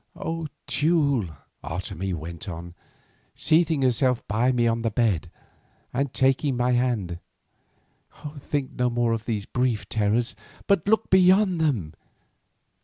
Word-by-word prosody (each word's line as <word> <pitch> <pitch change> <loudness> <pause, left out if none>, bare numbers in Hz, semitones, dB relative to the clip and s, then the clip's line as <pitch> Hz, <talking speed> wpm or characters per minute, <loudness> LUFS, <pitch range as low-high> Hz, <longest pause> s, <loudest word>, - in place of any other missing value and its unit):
"O 165 -1 -4 0.2
Teule," 140 - +1 0.3
Otomie 90 +1 -4
went 85 +5 -7
on, 85 0 -7 0.6
seating 160 -3 +2
herself 125 0 +1
by 115 +5 +2
me 120 -2 +1
on 115 0 +1
the 115 - 0
bed, 105 -7 0 0.6
and 135 +1 -1
taking 135 0 +1
my 125 +1 +1
hand, 120 -9 0 1.2
"think 140 -1 -3
no 125 0 0
more 120 -1 +1
of 115 0 -4
these 105 -4 -2
brief 120 -6 -1
terrors, 110 +2 0 0.3
but 200 -3 +2
look 220 +1 +2
beyond 185 -1 +5
them. 110 - 0
120 Hz, 125 wpm, -25 LUFS, 105-145 Hz, 1.2 s, beyond